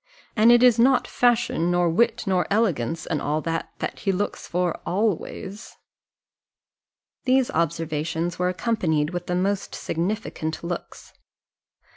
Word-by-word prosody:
And 225 +2 +6
it 240 +1 +6
is 245 -2 +6
not 255 +2 +4
fashion, 240 -8 +1
nor 175 0 +2
wit, 230 +7 +2
nor 185 -3 +1
elegance, 165 - 0
and 155 -4 -2
all 150 +2 0
that, 165 0 -3
that - - -4
he 195 - 0
looks 200 +2 -3
for 175 -1 -1
always." 200 +1 -3 1.5
These 260 -1 +3
observations 165 +1 -2
were 180 0 +2
accompanied 170 -6 0
with 175 -1 -5
the 180 - -1
most 195 +2 -1
significant 165 -3 -3
looks. 170 0 -6
180 Hz, 130 wpm, -24 LUFS, 165-220 Hz, 1.5 s, And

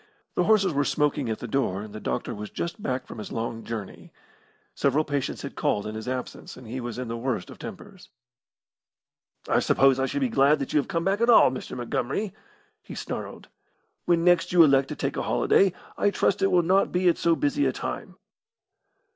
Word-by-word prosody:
The - - +1
horses 200 -5 +3
were 145 0 +2
smoking 145 -3 0
at 110 - -2
the 120 - -7
door, 105 -6 -1
and 105 -1 -10
the 110 - -6
doctor 120 - -3
was 105 -1 -7
just 170 +5 -5
back 130 -5 -2
from - - -9
his 105 - -7
long 115 0 -4
journey. 110 -4 -7 0.6
Several 140 +3 +1
patients 145 -3 -3
had - - -6
called 105 - -1
in 105 - -5
his 110 +2 -7
absence, 130 0 -5
and 130 - -12
he 120 +4 -5
was 120 -1 -5
in 125 -1 -4
the 115 - -4
worst 115 -4 -3
of - - -13
tempers. - - -10 1.4
"I - - +3
suppose 135 -1 +3
I 135 - +1
should 285 - -2
be 265 - +2
glad 150 - +4
that 140 - -5
you 150 - +4
have 140 - -2
come 165 0 -1
back 195 +3 +1
at 235 - +3
all, 225 - +7
Mr. 130 - -6
Montgomery!" 130 - -2 0.5
he - - -10
snarled. - - -6 0.6
"When 170 -1 +2
next 175 0 +3
you 175 -2 +7
elect 135 -3 +4
to - - -4
take - - -3
a - - 0
holiday, 195 -1 +3 0.3
I 205 - +3
trust 200 -1 0
it 195 - +3
will 175 -1 +3
not 190 +4 +2
be 180 0 +1
at 175 - +3
so 165 -1 +3
busy 290 - +1
a - - +1
time." - - -6
140 Hz, 215 wpm, -26 LUFS, 120-180 Hz, 1.4 s, all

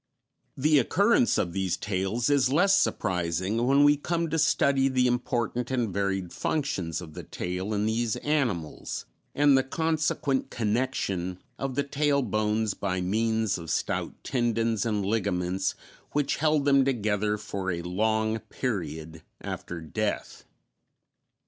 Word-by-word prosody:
The 150 +2 +4
occurrence 210 - +3
of 85 - -1
these 95 -2 -1
tails 100 +4 -1
is 135 -3 +3
less 195 +7 +4
surprising 95 +4 0
when 140 +2 +5
we 145 0 +6
come 165 +1 -2
to 160 - +1
study 140 -3 +3
the 130 -1 +2
important 120 0 -1
and 120 -7 -1
varied 95 -2 -1
functions 95 - -2
of 80 -3 -10
the - - -7
tail 90 +3 -4
in 105 0 0
these 110 0 0
animals, 120 - -2 0.3
and 145 -1 +5
the 135 - +5
consequent 155 -1 0
connection 105 -6 -1 0.2
of 135 -2 -3
the 140 - +1
tail 140 0 +1
bones 110 -1 0
by 95 -2 -2
means 110 +2 0
of 85 -1 -8
stout - - -1
tendons 115 -2 0
and 105 -3 0
ligaments 95 -3 0 0.4
which 145 -1 +1
held 155 -2 +2
them 140 -1 +5
together 105 -5 0
for 100 -2 -4
a 85 -1 -2
long 110 +4 0
period 80 - -4 0.2
after 85 -1 -5
death. 105 +6 -3
110 Hz, 135 wpm, -27 LUFS, 95-135 Hz, 0.4 s, we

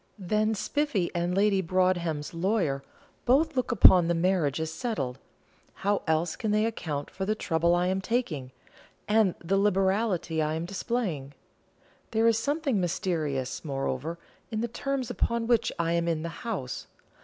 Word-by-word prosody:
Then 215 +3 0
Spiffy 225 -5 0
and 175 +1 -1
Lady 200 -1 +3
Broadhem's 175 -4 0
lawyer 170 -6 0 0.4
both 285 +5 +3
look 255 -1 0
upon 185 -6 +7
the 170 - +1
marriage 165 -5 +1
as 160 0 -2
settled: 140 - -3 0.7
how 205 0 +2
else 160 +1 +1
can 220 - -3
they 215 +1 +3
account 155 -10 -3
for 190 - -5
the 215 +3 0
trouble 170 -3 +1
I 175 0 +1
am 190 +1 0
taking, 185 - -2 0.6
and 210 -3 +3
the 190 +4 +1
liberality 195 -4 +1
I 155 0 0
am 165 +1 -3
displaying? 180 - -3 0.7
There 225 0 +1
is 225 -1 +4
something 280 - 0
mysterious, 160 -8 -2
moreover, 140 +2 -3 0.3
in 220 -1 -2
the 235 - 0
terms 265 +1 -3
upon 235 0 0
which 235 -1 +2
I 170 0 0
am 170 0 +1
in 160 -2 0
the 170 - -3 0.2
house. 130 - -4
185 Hz, 155 wpm, -28 LUFS, 160-220 Hz, 0.7 s, upon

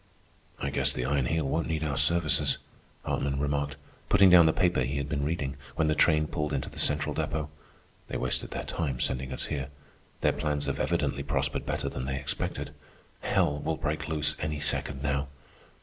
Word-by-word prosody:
"I - - -2
guess - - +2
the 60 - -3
Iron 70 -1 +1
Heel 80 -3 0
won't 80 +4 0
need 80 -1 -1
our 75 -2 -1
services," 80 +3 +3 0.5
Hartman 70 -1 -1
remarked, 70 0 -1 0.3
putting 100 -2 +7
down 85 -2 +9
the - - +5
paper 90 -4 +2
he 65 +3 -1
had 70 0 -2
been 70 -1 -1
reading, 70 -3 -2 0.2
when 80 -1 +2
the - - +4
train 75 0 +4
pulled 75 -2 -2
into 70 - -2
the - - -7
central 75 0 +2
depot. 75 -1 -2 0.6
"They - - -3
wasted 65 - -1
their - - -4
time 70 -7 -2
sending 65 0 -1
us 65 - -2
here. 70 -3 -3 0.5
Their - - +3
plans 75 -1 -1
have - - -2
evidently 70 - 0
prospered 70 - -1
better - - -1
than 65 - -4
they 65 0 -2
expected. 65 -1 -3 0.5
Hell 75 0 +1
will 80 +2 -2
break 75 +1 -2
loose 75 -2 +2
any 75 -1 -2
second 70 -1 -1
now." 70 -1 0
75 Hz, 190 wpm, -29 LUFS, 70-80 Hz, 0.6 s, down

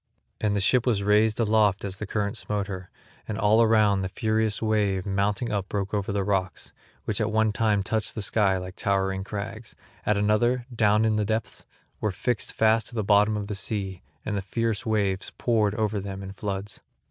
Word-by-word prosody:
And 105 -1 0
the - - +1
ship 125 +5 +3
was 105 -5 +2
raised 105 +2 +3
aloft 105 -3 +2
as 95 -1 -5
the 105 - -4
current 100 0 -1
smote 105 -1 -2
her, 95 -2 -7 0.4
and 110 - -3
all 110 +1 +4
around 110 -3 +4
the 95 - -2
furious 110 0 0
wave 105 -4 +1
mounting 100 +3 0
up 100 -2 -2
broke 100 -1 -3
over 100 -1 -1
the 100 -1 0
rocks, 95 -1 -2 0.3
which 110 0 -1
at 110 0 0
one 110 0 +2
time 105 -2 +1
touched 110 +2 -1
the 110 - -3
sky 100 -2 +2
like 90 0 -7
towering 95 -1 0
crags, 105 +2 -6 0.3
at 105 - +1
another, 120 +4 +2
down 105 -1 +3
in 110 -1 +2
the 105 - +1
depths, 110 +1 -3 0.3
were 105 - 0
fixed 120 +4 -1
fast 110 0 +2
at 120 - -12
the 110 - 0
bottom 105 +1 +4
of 105 - -3
the 105 - -4
sea 100 -2 -3 0.2
and 105 - -2
the 100 - -1
fierce 115 +3 -2
waves 100 -3 0
poured 110 -4 +1
over 110 -1 0
them 95 0 -6
in 95 - -7
floods. 100 0 -5
105 Hz, 200 wpm, -26 LUFS, 100-110 Hz, 0.4 s, all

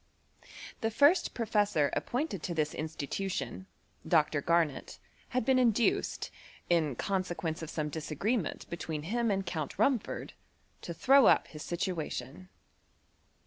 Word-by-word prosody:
259 - - -13
The 225 -1 -1
first 330 +5 +5
professor 205 - +1
appointed 245 - -2
to 175 - -3
this 155 -1 0
institution^ 150 - -4 0.4
Dr. 150 -1 +3
Garnet, 165 -3 0 0.3
had 255 -3 -1
been 260 0 +4
induced, 235 -2 +1 0.4
in 155 -6 +2
consequence 175 -2 -2
of 160 - -6
some 155 -2 -2
disagreement 160 - -2
between 160 -3 -4
him 230 +7 0
and 195 -1 0
Count 160 -5 -4
Rumford, 225 +2 0 0.5
to 170 - -6
throw 270 - +6
up - - +4
his 150 - -9
situation. 170 -3 -4
175 Hz, 125 wpm, -31 LUFS, 155-225 Hz, 0.5 s, throw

